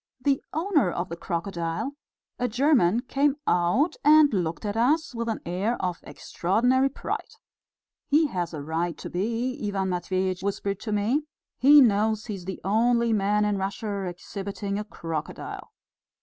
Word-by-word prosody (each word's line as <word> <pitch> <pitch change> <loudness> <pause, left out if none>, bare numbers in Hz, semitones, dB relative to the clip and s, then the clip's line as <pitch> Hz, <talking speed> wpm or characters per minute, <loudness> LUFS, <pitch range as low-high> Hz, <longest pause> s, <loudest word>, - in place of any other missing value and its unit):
The 270 +1 +1
owner 320 - +2
of 175 +1 -3
the 170 - -4
crocodile, 170 +5 -3 0.5
a 250 - +1
German, 240 - +3
came 275 +2 +1
out 180 - +2
and 300 -2 +6
looked 175 0 -2
at 205 0 -2
us 280 +7 +2
with 230 0 -3
an 220 - -3
air 190 +8 -1
of 180 -2 -2
extraordinary 245 +9 +1
pride. 275 - -5 0.7
"He 305 +3 +4
has 180 - -2
a 150 -3 -6
right 165 +2 -2
to - - -8
be," 235 - -2
Ivan 195 -2 -1
Matveitch 185 +1 -1
whispered 200 0 -2
to 220 - -5
me, 230 +9 0 0.3
"he 290 +3 +8
knows 220 -2 +2
he 215 - -4
is 185 -3 -8
the 190 0 -5
only 235 +3 +2
man 210 0 +2
in 205 -1 0
Russia 200 0 -3
exhibiting 200 +2 -5
a - - -3
crocodile." 165 -7 -6
210 Hz, 155 wpm, -26 LUFS, 185-250 Hz, 0.7 s, he